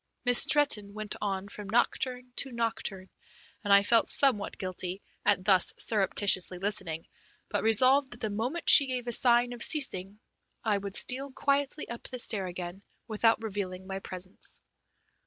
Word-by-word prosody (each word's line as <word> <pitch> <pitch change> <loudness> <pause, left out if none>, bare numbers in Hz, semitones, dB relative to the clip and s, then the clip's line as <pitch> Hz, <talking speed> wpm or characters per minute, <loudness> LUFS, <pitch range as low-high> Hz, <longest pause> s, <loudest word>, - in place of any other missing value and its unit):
Miss 245 -1 +7
Stretton 215 -9 +2
went 215 -1 -6
on 195 -1 -3
from 205 -1 -10
nocturne 250 +2 -2
to 270 - -1
nocturne, 225 -5 -4 0.5
and 205 - -2
I 200 0 +6
felt 230 +2 +2
somewhat 250 -8 0
guilty 185 0 -5 0.2
at 190 -2 0
thus 190 -3 +4
surreptitiously 195 -3 +2
listening, 185 -4 -4 0.4
but - - -2
resolved 255 +5 +3
that 240 - -9
the 220 - -3
moment 245 +11 -4
she 280 - +8
gave 250 -2 -4
a 240 - -4
sign 240 +1 +3
of 240 - -11
ceasing 210 - +3 0.4
I 210 -3 +1
would 200 0 -8
steal 270 +2 -2
quietly 280 +2 -2
up 235 - -8
the 255 - -7
stair 210 -5 0
again 180 +1 -8 0.3
without 225 +1 +1
revealing 190 -3 -6
my 190 0 -6
presence. 185 0 -8
215 Hz, 155 wpm, -28 LUFS, 195-245 Hz, 0.5 s, she